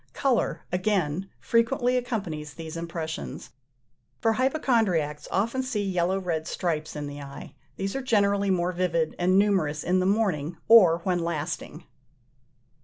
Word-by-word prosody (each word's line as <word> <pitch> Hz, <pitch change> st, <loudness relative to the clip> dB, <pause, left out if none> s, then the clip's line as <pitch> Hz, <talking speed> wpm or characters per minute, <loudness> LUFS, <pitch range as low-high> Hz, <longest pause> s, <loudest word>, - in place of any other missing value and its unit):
Colour, 265 Hz, -4 st, 0 dB
again, 185 Hz, -2 st, 0 dB
frequently 245 Hz, +2 st, +2 dB
accompanies 190 Hz, -12 st, -3 dB
these 160 Hz, -1 st, -7 dB
impressions: 160 Hz, -, -5 dB, 0.7 s
for 225 Hz, -, +2 dB
hypochondriacs 220 Hz, -, +1 dB
often 230 Hz, +7 st, 0 dB
see 250 Hz, -5 st, -2 dB
yellow 185 Hz, +1 st, +1 dB
red 165 Hz, -4 st, -2 dB
stripes 155 Hz, -4 st, -2 dB
in 150 Hz, -1 st, -4 dB
the 145 Hz, 0 st, -7 dB
eye: 140 Hz, 0 st, -9 dB, 0.2 s
these 195 Hz, +3 st, -3 dB
are 270 Hz, -, -1 dB
generally 200 Hz, -5 st, +2 dB
more 180 Hz, -1 st, +1 dB
vivid 170 Hz, -3 st, 0 dB
and 185 Hz, +2 st, +3 dB
numerous 185 Hz, -8 st, +2 dB
in 185 Hz, +2 st, +2 dB
the 185 Hz, -, +1 dB
morning, 180 Hz, -7 st, 0 dB
or 180 Hz, -7 st, +7 dB
when 180 Hz, -2 st, +1 dB
lasting. 165 Hz, -1 st, -4 dB
180 Hz, 135 wpm, -26 LUFS, 160-215 Hz, 0.7 s, or